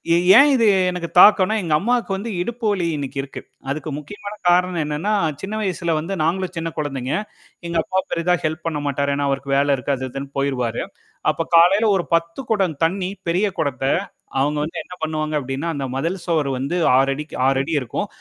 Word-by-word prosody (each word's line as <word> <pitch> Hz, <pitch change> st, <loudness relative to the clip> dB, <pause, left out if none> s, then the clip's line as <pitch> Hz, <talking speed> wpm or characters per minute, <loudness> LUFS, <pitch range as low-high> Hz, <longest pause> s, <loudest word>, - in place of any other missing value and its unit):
எ -, -, +4 dB, 0.2 s
ஏன் 285 Hz, +2 st, +7 dB
இது 230 Hz, -3 st, +3 dB, 0.2 s
எனக்குத் 180 Hz, -2 st, -5 dB
தாக்கன்னா? 210 Hz, +1 st, +7 dB
எங்க 165 Hz, -3 st, -1 dB
அம்மாக்கு 235 Hz, +3 st, 0 dB
வந்து 215 Hz, +4 st, -5 dB
இடுப்பு 235 Hz, +4 st, -4 dB
வலி 185 Hz, -4 st, 0 dB
இன்னைக்கு 140 Hz, -1 st, -5 dB
இருக்கு. 135 Hz, -, -8 dB, 0.3 s
அதுக்கு 155 Hz, +2 st, -3 dB
முக்கியமான 205 Hz, +7 st, -8 dB
காரணம் 180 Hz, -1 st, +2 dB
என்னான்னா, 150 Hz, +8 st, -1 dB, 0.3 s
சின்ன 200 Hz, +3 st, -4 dB
வயசுல 180 Hz, -4 st, -1 dB
வந்து 165 Hz, +5 st, -4 dB
நாங்களும் 185 Hz, +3 st, -1 dB
சின்னக் 165 Hz, 0 st, -4 dB
கொழந்தைங்க. 135 Hz, -4 st, -3 dB, 0.5 s
எங்க 170 Hz, -, -5 dB
அப்பா 190 Hz, -, -1 dB
பெரிதா 170 Hz, +1 st, +1 dB
ஹெல்ப் 155 Hz, +1 st, -2 dB
பண்ண 155 Hz, -3 st, -2 dB
மாட்டாரு. 140 Hz, 0 st, 0 dB
ஏன்னா 145 Hz, 0 st, -1 dB
அவருக்கு 135 Hz, 0 st, -2 dB
வேலை 140 Hz, 0 st, +3 dB
இருக்கு. 135 Hz, +2 st, -1 dB
அது 130 Hz, 0 st, -4 dB
இதுன்னு 135 Hz, +1 st, -6 dB
போயிருவாரு. 125 Hz, -4 st, -1 dB, 0.5 s
அப்பக் 165 Hz, +1 st, -5 dB
காலைல 190 Hz, +6 st, +6 dB
ஒரு 185 Hz, -, 0 dB
10 165 Hz, +7 st, -2 dB
குடம் 190 Hz, -8 st, +1 dB
தண்ணீ 180 Hz, +3 st, 0 dB, 0.2 s
பெரிய 185 Hz, +5 st, +2 dB
குடத்த, 145 Hz, -4 st, -1 dB, 0.6 s
அவுங்க 150 Hz, +2 st, 0 dB
வந்து 165 Hz, +1 st, -6 dB
என்ன 180 Hz, -, -12 dB
பண்ணுவாங்க 155 Hz, -1 st, -2 dB
அப்டின்னா, 135 Hz, +5 st, -3 dB
அந்த 140 Hz, -1 st, -3 dB
மதில் 165 Hz, +8 st, -2 dB
சுவர் 155 Hz, -5 st, +1 dB
வந்து 140 Hz, +6 st, -2 dB, 0.2 s
6'க்கு 135 Hz, +3 st, 0 dB
6' 135 Hz, +4 st, +1 dB
இருக்கும். 125 Hz, -, -3 dB
165 Hz, 180 wpm, -21 LUFS, 140-185 Hz, 0.6 s, ஏன்